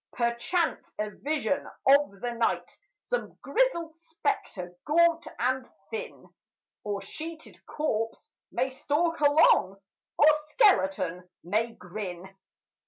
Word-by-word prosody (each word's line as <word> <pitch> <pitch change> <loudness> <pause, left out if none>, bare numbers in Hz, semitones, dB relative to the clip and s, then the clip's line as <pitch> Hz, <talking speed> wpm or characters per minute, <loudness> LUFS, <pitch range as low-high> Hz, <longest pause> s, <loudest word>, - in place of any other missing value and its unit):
Perchance 240 +9 0
a 210 0 -2
vision 280 +2 -1 0.2
of 270 -8 +4
the 245 -1 -2
night, 230 -1 -1 0.3
Some - - -3
grizzled 340 -10 +1
spectre, 325 - -3
gaunt 335 +2 +3
and 255 +1 0 0.2
thin, 465 +2 -6 0.6
Or 200 -1 -3
sheeted 320 +9 -8
corpse, 225 -7 -2 0.2
may 260 +2 0
stalk 320 +5 0
along, 290 - +5 0.4
Or 295 - +6 0.2
skeleton 260 - +2
may 220 +6 0
grin. 185 0 -7
270 Hz, 105 wpm, -28 LUFS, 210-330 Hz, 0.6 s, Or